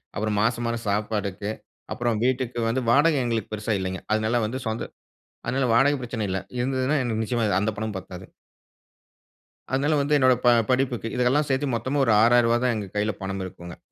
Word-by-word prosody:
அப்புறம் 105 +1 -1
மாசம் 115 +2 0
மாசம் 115 0 -3
சாப்பாடுக்கு, 105 -1 -2 0.4
அப்புறம் 120 -2 -1
வீட்டுக்கு 125 -2 -1
வந்து 125 +2 -1
வாடகை 145 +3 +4
எங்களுக்கு 115 -3 -2
பெரிசா 105 +1 -1
இல்லைங்க, 95 0 -4
அதனால 110 +2 +1
வந்து 130 +4 -4
சொந்த 110 +1 -3 0.6
அதனால 130 +2 0
வாடக 140 +4 +4
பிரச்சன 120 -3 -4
இல்ல, 95 - -1 0.2
இருந்ததுனா 130 +2 0
எனக்கு 115 -2 -1
நிச்சயமா 120 +1 -1 0.2
அந்த 105 +2 +1
பணமும் 110 -1 -4
பத்தாது. 95 0 -10 1.5
அதனால, 145 +3 +2
வந்து 150 +1 +2
என்னோட 130 -2 +5
ப - - +7 0.2
படிப்புக்கு 125 -3 0
இதெல்லாம் 130 +4 +2
சேர்த்து 135 -1 0
மொத்தமா 130 +5 -1
ஒரு 115 - +3
ரூ.6,000 120 0 +4
தான் 125 -2 +2
எங்க 105 -3 -4
கைல 105 +1 +1
பணம் 95 0 -4
இருக்குங்க. 85 -1 -10
115 Hz, 170 wpm, -24 LUFS, 105-130 Hz, 1.5 s, ப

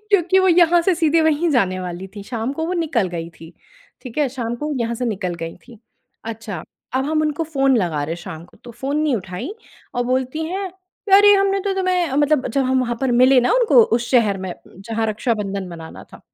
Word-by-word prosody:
क्योंकि 375 -1 +4
वो 375 0 +4
यहाँ 345 0 +5
से 370 +1 +2
सीधे 325 -1 +2
वहीं 315 +2 +2
जाने 190 -9 +1
वाली 180 +1 -6
थी, 200 - -6
शाम 230 +3 -3
को 320 +3 -3
वो 360 - -2
निकल 285 - 0
गई 170 -1 -5
थी। 165 +1 -14 0.5
ठीक 250 +2 -7
है, 290 - +2
शाम 240 -2 -4
को 295 - -5
वो 300 - -2
यहाँ 235 0 -1
से 250 +2 -3
निकल 190 -6 -2
गई 165 - -7
थी। 240 -3 -14 0.5
अच्छा, 220 -6 -6 0.3
अब 265 +1 +1
हम 310 0 +1
उनको 305 +1 -1
फ़ोन 275 -4 +2
लगा 170 -8 0
रहे 165 +3 -4
शाम 160 +1 -8
को, - - -21
तो 240 - -9
फ़ोन 270 +5 -3
नहीं 290 -6 +1
उठाई 195 - -6 0.4
और 245 0 0
बोलती 260 +5 -1
हैं, 380 +3 -3 0.4
"अरे! 410 +1 +8
हमने 390 0 +2
तो 395 0 -1
तुम्हें 365 -5 0
"मतलब 290 -1 +2
जब 270 +3 0
हम 260 0 +2
वहाँ 240 -1 -2
पर 265 -2 +1
मिले 260 0 +6
ना 245 - +2
उनको 480 -1 +5
उस 235 0 -4
शहर 220 -6 +3
में 185 - -4 0.3
जहाँ 225 +2 -2
रक्षाबंधन 210 -3 -2
मनाना 165 -2 -10
था। - - -13
255 Hz, 220 wpm, -20 LUFS, 210-320 Hz, 0.5 s, अरे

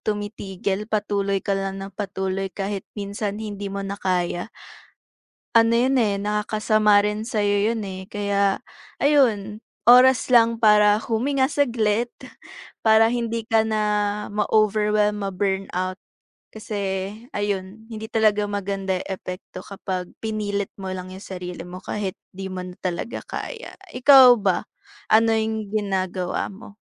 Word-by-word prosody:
tumitigil, 205 -1 -3
patuloy 200 -2 0
ka 200 - 0
lang 195 0 -2
nang 195 0 -7
patuloy 195 -1 -3
kahit 195 0 -4
minsan 200 0 -3
hindi 205 -2 -5
mo 200 0 -4
na 195 +1 -4
kaya. 180 0 -1 1.1
Ano 230 0 +5
'yon, 255 +3 +3
eh, 210 -5 +2
nakakasama 210 0 +2
rin 210 +1 -2
sa'yo 205 -3 +1
'yon, 225 - -3
eh. 190 -1 -7
Kaya, 200 -1 0 0.4
ayun, 225 -8 +3 0.3
oras 250 +1 +6
lang 230 -1 +5
para 210 -2 +5
huminga 260 +5 0
saglit 240 -5 +1 0.7
para 220 0 +5
hindi 230 -2 -2
ka 225 -1 +3
na 215 -1 0 0.5
ma-overwhelm, 210 0 +2
ma-burnout. 190 -1 -2 0.5
Kasi 215 -1 -6 0.6
ayun, 205 +1 -3
hindi 220 0 -6
talaga 215 -2 +2
maganda 195 -1 -2
'yong - - -6
epekto 185 0 -7
kapag 185 -2 -5
pinilit 205 -2 -2
mo 190 - -4
lang 185 0 -6
'yong 190 - -10
sarili 180 -4 -7
mo 180 +1 -8
kahit 200 -3 -3 0.2
'di 190 0 -5
mo 185 -1 -5
na 180 - -8
talaga 185 +5 -3
kaya. 480 -1 -6 0.2
Ikaw 260 +1 +8
ba 190 -3 +1 0.5
ano 225 +1 +5
'yong 220 -1 -2
ginagawa 190 -3 -1
mo? 205 +1 -13
205 Hz, 130 wpm, -23 LUFS, 195-220 Hz, 1.1 s, Ikaw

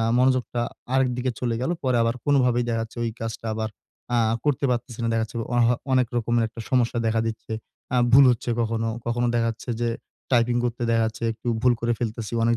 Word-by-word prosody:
আ - - +2 0.2
মনোযোগটা 125 -2 +2 0.3
আরেকদিকে 130 -1 +1
চলে 120 -2 0
গেল। 130 - -1
পরে 130 -2 +2
আবার 115 +1 +1
কোনভাবেই 125 -4 +3
দেখা 115 -1 0
যাচ্ছে 115 +1 -9
ওই 115 - 0
কাজটা 115 0 -5
আবার 110 0 -2 0.5
আ - - +4 0.3
করতে 145 -1 +1
পারতেছি 120 -1 -3
না। - - 0
দেখা 115 0 +1
যাচ্ছে 115 - -10 0.2
অহ 120 -1 +4 0.3
অনেক 130 -2 +4
রকমের 120 0 +1
একটা 115 +1 -10
সমস্যা 120 -2 +2
দেখা 110 0 +2
দিচ্ছে। 110 0 -5 0.4
আ - - +3 0.2
ভুল 135 +1 +9
হচ্ছে 120 0 -1
কখনো, 115 0 0 0.2
কখনো, 120 +1 +1
দেখা 115 -1 +2
যাচ্ছে 115 +2 -8
যে 120 - +2 0.4
টাইপিং 120 0 +3
করতে 120 0 -2
দেখা 115 0 +3
যাচ্ছে, 115 +1 -5
একটু 115 +2 -7
ভুল 125 -1 +5
করে 120 0 +1
ফেলতেছি 115 -2 -4
অনেক 115 0 +3
120 Hz, 205 wpm, -24 LUFS, 115-125 Hz, 0.5 s, ভুল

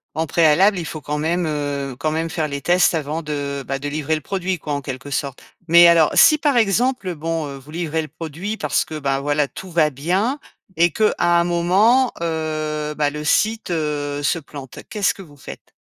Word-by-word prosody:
en 160 +1 -1
préalable 170 +6 +4
il 170 - -4
faut 155 0 -6
quand 150 +2 -3
même, 165 +2 0
heu 145 -3 -3
quand 155 +1 0
même 165 +1 -2
faire 160 -2 -2
les 140 -1 -5
tests, 175 +2 +3
avant 155 +1 -3
de 140 -2 -4
bah, 135 0 -2
de 145 - -4
livrer 150 +1 -2
le 155 - -1
produit 185 +2 -3
quoi 150 - -4
en 140 - -2
quelque 135 +1 -7
sorte. 140 -1 -3 0.3
Mais 170 +1 +8
alors 165 -2 +5
si 305 - +6
par 290 -4 +1
exemple 220 -2 +1
bon, 165 0 -3
heu, 140 -1 -7
vous 140 +3 -14
livrez 160 -1 -2
le 155 - -8
produit 165 +8 -6
parce - - 0
que, 155 -1 -6
ben 135 -1 0
voilà 145 0 0
tout 185 +4 -10
va 160 -2 +3
bien. 185 - -1 0.4
Et 170 +1 +3
qu'à 215 -1 +2
un 175 0 +3
moment, 195 +9 +3
heu, 155 -2 -2
bah, 145 -1 +2
le 150 0 -6
site, 220 +6 +1
heu, 145 -3 -2
se 165 - +1
plante, 140 -3 -10
qu'est-ce 205 -2 +1
que 195 - -12
vous 145 -5 -15
faites? - - -12
155 Hz, 210 wpm, -20 LUFS, 145-175 Hz, 0.4 s, Mais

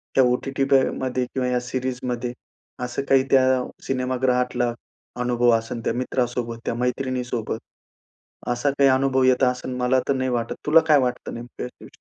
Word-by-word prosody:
त्या 135 - +6
ओ-टी-टी 130 +2 0
पे 135 -1 +7 0.2
मध्ये 130 -1 -1
किंवा 125 0 -2
या 125 0 +1
सीरीजमध्ये 125 -1 -3 0.5
असं 125 +2 -2
काही 135 -1 +5
त्या 130 -1 +4 0.2
सिनेमागृहातला 125 -2 0 0.5
अनुभव 120 0 +2
असेल 115 +1 -5
त्या - - +1
मित्रासोबत, 120 -2 -2
त्या - - -1
मैत्रिणीसोबत, 125 -2 -2 0.9
असा 120 +4 +1
काही 140 -1 +5
अनुभव 130 0 +2
येत 130 +1 +3
असेल, 125 0 0
मला 125 +1 +2
तर - - +4
नाही 130 0 -1
वाटत. 120 -2 -2
तुला 155 +2 +7
काय 150 -2 +6
वाटतं 125 -2 -2
नेमकं 120 +1 -8
125 Hz, 150 wpm, -23 LUFS, 125-130 Hz, 0.9 s, पे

